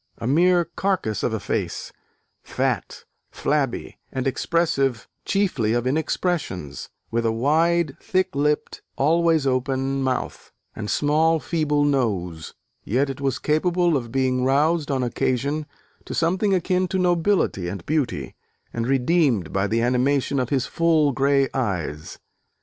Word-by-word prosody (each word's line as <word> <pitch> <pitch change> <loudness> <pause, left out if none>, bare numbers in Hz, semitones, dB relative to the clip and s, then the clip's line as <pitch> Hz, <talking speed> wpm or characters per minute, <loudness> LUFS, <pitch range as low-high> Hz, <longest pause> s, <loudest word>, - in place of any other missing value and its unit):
a 115 - -6
mere 175 +6 +4
carcase 170 - -1
of - - 0
a - - -2
face; - - -3 0.5
fat, - - -2 0.3
flabby, 140 -5 -2
and 130 -1 -3
expressive 135 -4 0 0.2
chiefly 165 - +1
of 120 0 0
inexpressions," 140 - -2 0.2
with 115 0 0
a 115 - +2
wide, 160 +8 +2
thick 185 0 0
lipped, 150 +1 0
always 165 +1 +2
open 135 +1 0
mouth, 130 -1 -3 0.2
and 105 -1 -5
small 160 +2 +2
feeble 150 -3 0
nose. 95 - -1 0.3
Yet 135 +6 0
it 135 - -9
was 135 -2 0
capable 170 +3 +1
of 120 -4 -3
being 130 0 +1
roused, 150 +4 +2
on 135 -2 0
occasion, 140 +5 -1 0.4
to - - -5
something 185 +5 +1
akin 185 +1 +1
to 190 - -2
nobility 175 - +1
and 90 -1 -6
beauty, 135 - -1 0.4
and 115 0 -2
redeemed 135 - +2
by 95 +1 +1
the 115 +3 0
animation 130 +3 +1
of 125 -1 -1
his 135 -3 +1
full, 160 -3 +2
grey 140 +1 +2
eyes. 90 - -3
140 Hz, 135 wpm, -23 LUFS, 125-165 Hz, 0.5 s, mere